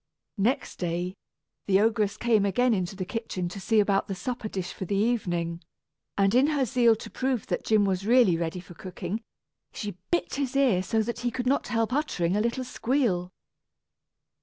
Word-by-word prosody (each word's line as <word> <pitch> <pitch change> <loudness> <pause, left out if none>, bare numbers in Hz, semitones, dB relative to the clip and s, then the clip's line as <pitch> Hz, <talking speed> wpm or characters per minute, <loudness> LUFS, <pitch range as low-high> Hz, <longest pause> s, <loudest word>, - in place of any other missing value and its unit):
Next 235 +7 0
day, 175 +1 -2 0.5
the 195 -1 +4
ogress 215 -1 +1
came 225 -3 +3
again 235 +5 +2
into 190 -1 -2
the 185 -1 -4
kitchen 190 -4 -3
to 190 - -7
see 220 +3 +2
about 200 -1 +2
the 195 - -3
supper 235 +4 -4
dish 185 -2 -4
for 190 - -5
the 200 - -1
evening, 175 -6 0 0.6
and 195 0 +3
in 260 +4 +5
her 290 -4 +1
zeal 240 -2 +4
to - - -9
prove 260 -3 -1
that - - -2
Jim 215 -2 +3
was 190 +1 -1
really 235 -7 +5
ready 165 +1 -2
for 175 0 -12
cooking, 185 +4 -5 0.5
she 205 -4 -6
bit 345 - 0
his 275 -2 -2
ear 255 -10 +4
so 220 +4 0
that 235 +1 -4
he 245 0 0
could 245 +1 -4
not 270 +3 +1
help 230 0 0
uttering 195 - 0
a 210 - +2
little 235 +3 -1
squeal. 235 -8 0
210 Hz, 185 wpm, -27 LUFS, 185-245 Hz, 0.6 s, in